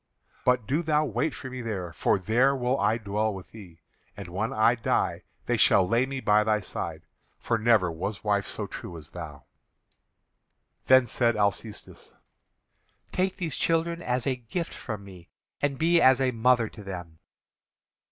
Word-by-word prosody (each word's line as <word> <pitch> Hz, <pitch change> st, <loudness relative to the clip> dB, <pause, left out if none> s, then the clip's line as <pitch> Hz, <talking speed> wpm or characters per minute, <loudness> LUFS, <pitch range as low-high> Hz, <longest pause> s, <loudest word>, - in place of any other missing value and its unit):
But 125 Hz, -3 st, +2 dB
do 145 Hz, +9 st, 0 dB
thou 155 Hz, -2 st, +2 dB
wait 150 Hz, +1 st, -1 dB
for -, -, -8 dB
me 130 Hz, -1 st, -6 dB
there, 95 Hz, -7 st, -4 dB
for -, -, +2 dB
there 120 Hz, +8 st, +2 dB
will 125 Hz, +1 st, 0 dB
I 115 Hz, -, +2 dB
dwell 105 Hz, 0 st, -1 dB
with 95 Hz, -2 st, -9 dB
thee; 90 Hz, -7 st, -13 dB, 0.4 s
and 100 Hz, -3 st, -8 dB
when 100 Hz, +6 st, -2 dB
I 110 Hz, +2 st, +4 dB
die 115 Hz, -, 0 dB, 0.2 s
they -, -, +1 dB
shall 95 Hz, -2 st, +5 dB
lay 120 Hz, +5 st, +2 dB
me 135 Hz, 0 st, -4 dB
by 105 Hz, -3 st, +3 dB
thy 105 Hz, 0 st, +2 dB
side, -, -, -5 dB, 0.3 s
for 115 Hz, -1 st, -1 dB
never 110 Hz, -6 st, +3 dB
was 95 Hz, +5 st, -5 dB
wife 100 Hz, -2 st, +1 dB
so -, -, -3 dB
true 85 Hz, -, -8 dB
as 75 Hz, -1 st, -12 dB
thou." 75 Hz, -6 st, -8 dB, 1.4 s
Then 130 Hz, -1 st, +7 dB
said 120 Hz, 0 st, +1 dB
Alcestis: 105 Hz, +1 st, -3 dB, 1.0 s
"Take 185 Hz, +1 st, 0 dB
these 165 Hz, -4 st, -3 dB
children 170 Hz, +1 st, 0 dB
as 125 Hz, -4 st, -1 dB
a 135 Hz, -, +1 dB
gift 145 Hz, +9 st, -5 dB
from 105 Hz, -4 st, -6 dB
me, 90 Hz, -3 st, -13 dB, 0.3 s
and 145 Hz, -2 st, 0 dB
be 170 Hz, +3 st, +3 dB
as 130 Hz, 0 st, +6 dB
a 130 Hz, -1 st, +2 dB
mother 120 Hz, 0 st, +3 dB
to 105 Hz, -, -12 dB
them." 90 Hz, -4 st, -8 dB
115 Hz, 170 wpm, -27 LUFS, 100-130 Hz, 1.4 s, Then